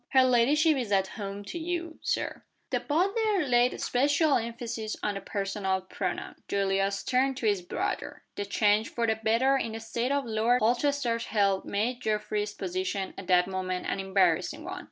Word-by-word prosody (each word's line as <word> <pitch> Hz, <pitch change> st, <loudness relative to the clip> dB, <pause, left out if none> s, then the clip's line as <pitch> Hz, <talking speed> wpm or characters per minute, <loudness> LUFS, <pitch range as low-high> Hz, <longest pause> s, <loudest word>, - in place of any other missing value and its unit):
"Her 260 Hz, -1 st, +7 dB
ladyship 280 Hz, +5 st, +4 dB
is 240 Hz, -5 st, -3 dB
at 190 Hz, -1 st, +2 dB
home 200 Hz, -1 st, -6 dB
to 340 Hz, -, -5 dB
you,, 335 Hz, 0 st, -4 dB
Sir."' -, -, -2 dB, 0.3 s
The -, -, +1 dB
butler 390 Hz, +3 st, +1 dB
laid 245 Hz, 0 st, +4 dB
a -, -, -8 dB
special 285 Hz, +4 st, +2 dB
emphasis 230 Hz, -1 st, -3 dB
on 210 Hz, -, 0 dB
the 195 Hz, -, -5 dB
personal 195 Hz, -2 st, -2 dB
pronoun. 185 Hz, -, -4 dB
Julius 195 Hz, 0 st, 0 dB
turned 260 Hz, +1 st, +1 dB
to 250 Hz, -, -4 dB
his 205 Hz, -3 st, +2 dB
brother. 390 Hz, -, -4 dB
The 205 Hz, -, -3 dB
change 210 Hz, +2 st, +2 dB
for 235 Hz, -, -1 dB
the 220 Hz, -1 st, +1 dB
better 230 Hz, +5 st, +3 dB
in 230 Hz, -4 st, -3 dB
the 225 Hz, -, -4 dB
state 235 Hz, +3 st, -2 dB
of 280 Hz, -1 st, +1 dB
Lord 230 Hz, +2 st, +2 dB
Holchester's 240 Hz, 0 st, +1 dB
health 200 Hz, -3 st, +1 dB
made 240 Hz, +5 st, -1 dB
Geoffrey's 210 Hz, -1 st, -1 dB
position, 185 Hz, +1 st, -3 dB
at 190 Hz, -, -9 dB
that 180 Hz, -1 st, +5 dB
moment, 185 Hz, -1 st, -3 dB
an -, -, -2 dB
embarrassing 190 Hz, -, +1 dB
one. 370 Hz, +2 st, -5 dB
225 Hz, 175 wpm, -28 LUFS, 200-270 Hz, 0.3 s, Her